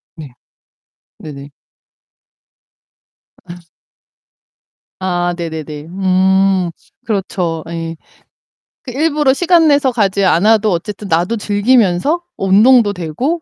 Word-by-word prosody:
네. 155 -4 -10 0.9
네네. 140 -2 -10 2.0
아 - - -6 1.5
아, 175 -1 -1
네네네. 160 -3 -6
음, 190 0 +1 0.3
그렇죠. 180 -6 -3
예. 165 -1 -5 0.9
그 255 - -8
일부러 295 0 +1
시간 335 +1 +3
내서 285 -2 +3
가지 200 -4 0
않아도 210 +4 +3
어쨌든 205 +4 -4
나도 175 +7 0
즐기면서 210 - +1 0.2
어, 195 - -3
운동도 210 +2 +4
되고 200 - -3
195 Hz, 185 characters per minute, -15 LUFS, 170-240 Hz, 2.0 s, 운동도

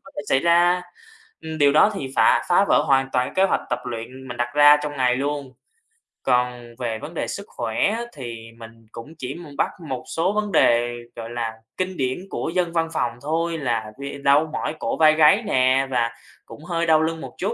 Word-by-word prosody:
cái 275 - -15
phải 195 - -3
xảy 135 - +4
ra. 175 +2 +3 0.6
Ừm, 160 0 -6
điều 145 -1 +5
đó 155 +8 +5
thì 140 -9 -4
phà - - +4
phá 180 +3 +4
vỡ - - +4
hoàn 135 -1 +3
toàn 125 0 0
kế 190 - +4
hoạch 195 - +1
tập 125 - 0
luyện 125 +2 -7
mình 120 - -6
đặt 120 0 -1
ra 145 0 +8
trong 150 0 -3
ngày 125 -2 +2
luôn. 140 0 -3 0.7
Còn 125 -2 -1
về 115 -3 -3
vấn 160 - -8
đề - - -3
sức 200 - -5
khỏe 120 - -1 0.2
thì 120 -5 -8
mình 115 0 -13
cũng 145 +8 -10
chỉ 130 0 -5
mùng 155 -5 -11
bắt - - +2 0.2
một 130 -2 -4
số 180 +5 +1
vấn 210 -1 -1
đề, 120 -7 +3 0.2
gọi 115 0 -7
là, 115 -2 -3 0.2
kinh 185 0 -3
điển 130 +2 -1
của - - -3
dân 175 -2 0
văn 165 -1 0
phòng - - 0
thôi 165 +2 -1
là 115 -7 -2
về 140 0 -6
đau 145 +3 +4
mỏi 155 - -3
cổ - - -2
vai 155 -1 +6
gáy 160 +9 +5
nè 130 -6 +2
và 115 -2 +1 0.3
cũng 150 - -13
hơi 170 -1 -1
đau 160 -1 +4
lưng 160 0 -2
một 130 -2 -9
chút. - - -2
140 Hz, 215 wpm, -22 LUFS, 125-165 Hz, 0.7 s, ra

